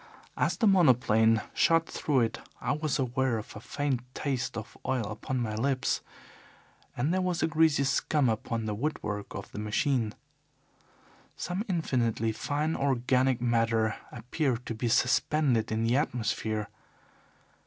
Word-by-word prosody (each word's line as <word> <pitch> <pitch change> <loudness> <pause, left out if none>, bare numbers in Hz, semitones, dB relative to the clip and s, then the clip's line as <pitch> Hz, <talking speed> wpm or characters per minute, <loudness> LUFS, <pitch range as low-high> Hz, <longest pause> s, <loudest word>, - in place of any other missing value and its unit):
As - - 0
the 230 - +2
monoplane 120 - +4
shot 165 0 +3
through 140 -4 0
it, 115 - -1 0.2
I 125 - -1
was 150 -1 0
aware 130 -1 0
of 110 - -8
a - - -6
faint 135 +2 -2
taste 135 -6 -2
of 110 - -7
oil 130 -3 0
upon 110 +5 -3
my 110 -3 -2
lips, 130 +4 0 1.0
and 140 +8 +1
there 185 - +1
was 180 -2 0
a - - +3
greasy 160 -3 +3
scum 140 +1 +1
upon 115 0 -1
the 105 - -2
woodwork 105 -5 -3
of 95 - -7
the - - -6
machine. 110 +1 0 1.2
Some 180 +3 -3
infinitely 120 - 0
fine 150 +7 -1
organic 130 -1 +1
matter 115 -2 +2 0.2
appeared 125 +1 -2
to - - -3
be 115 +2 -2
suspended 125 0 +2
in 110 +1 0
the 115 +3 +2
atmosphere. 110 -5 -1
125 Hz, 145 wpm, -29 LUFS, 110-145 Hz, 1.2 s, monoplane